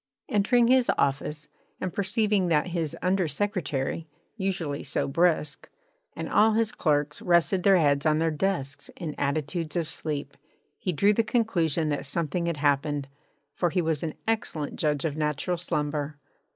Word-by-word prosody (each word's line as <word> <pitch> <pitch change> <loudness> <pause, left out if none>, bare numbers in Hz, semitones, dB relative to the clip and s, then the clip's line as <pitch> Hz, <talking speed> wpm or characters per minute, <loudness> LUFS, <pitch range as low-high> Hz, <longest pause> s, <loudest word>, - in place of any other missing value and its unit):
Entering 230 +4 +3
his 255 0 +4
office, 150 +2 -1 0.3
and 185 - -3
perceiving 205 -1 +1
that 160 +1 +2
his 165 -4 -2
under 185 -1 +2
secretary 165 -4 -2 0.3
(usually 185 -8 -2
so 140 - -1
brisk) 155 -1 +1 0.5
and - - -4
all 220 +1 +4
his 225 0 +2
clerks 150 -2 0
rested 175 +2 +3
their 195 0 +5
heads 145 -3 +3
on 155 -1 +3
their 165 0 +1
desks 150 -4 -2
in 160 -5 -4
attitudes 155 +3 -2
of 170 -3 0
sleep, 145 -3 -4 0.4
he 185 - -1
drew 200 +6 +3
the 230 - +3
conclusion 175 - +1
that 145 -2 -2
something 170 +3 -1
had 170 -2 -1
happened, 145 -1 0 0.4
for 175 - +1
he 180 +2 +1
was 160 -2 0
an 160 -2 -3
excellent 165 -10 -1
judge 150 -2 0
of 150 -3 -1
natural 150 +3 -1
slumber. 150 -3 -2
160 Hz, 155 wpm, -27 LUFS, 145-190 Hz, 0.5 s, their